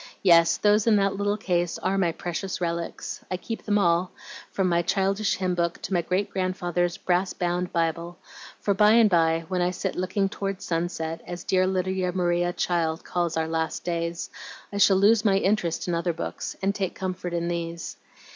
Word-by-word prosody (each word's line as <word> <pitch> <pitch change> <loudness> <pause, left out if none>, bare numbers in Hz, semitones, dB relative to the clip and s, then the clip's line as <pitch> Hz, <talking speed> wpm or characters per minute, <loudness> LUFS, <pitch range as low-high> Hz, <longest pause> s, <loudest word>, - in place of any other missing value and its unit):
Yes, 170 -3 +6
those 210 +1 +3
in 225 - +6
that 195 -1 +2
little 205 +1 0
case 175 -4 -1
are 190 +1 -1
my 185 -4 +2
precious 175 +3 -4
relics. 170 -1 -4
I 185 - -2
keep 225 +5 -6
them 205 -1 +1
all, 175 -1 +2 0.4
from 190 -2 0
my 170 -1 +2
childish 195 +3 +1
hymn 185 -1 -1
book 170 -1 -1
to - - -3
my 175 - +3
great 185 +4 -1
grandfather's 175 -2 -1
brass 180 +1 0
bound 175 0 -1
Bible, 170 +1 -1 0.4
for 200 - +1
by 210 +2 +5
and 225 -3 +5
by 165 -1 +2
when 185 -1 -1
I 175 - +2
sit 180 - -3
'Looking 185 +2 0
towards 195 0 -4
Sunset,' 165 -1 -2
as 175 -1 -6
dear 185 0 +2
Lydia 185 -1 -1
Maria 175 -1 +1
Child 165 -2 -1
calls 170 -2 -1
our 160 0 0
last 160 0 -2
days, 170 -1 -3 0.4
I 200 - -2
shall 195 -1 +6
lose 210 +3 +4
my 200 -3 +4
interest 195 -4 0
in 175 - 0
other 170 +1 0
books, 165 - -5
and 195 +1 +2
take 195 -3 -3
comfort 185 -1 -4
in 170 0 -1
these. 170 -1 -4
180 Hz, 190 wpm, -25 LUFS, 170-195 Hz, 0.4 s, Yes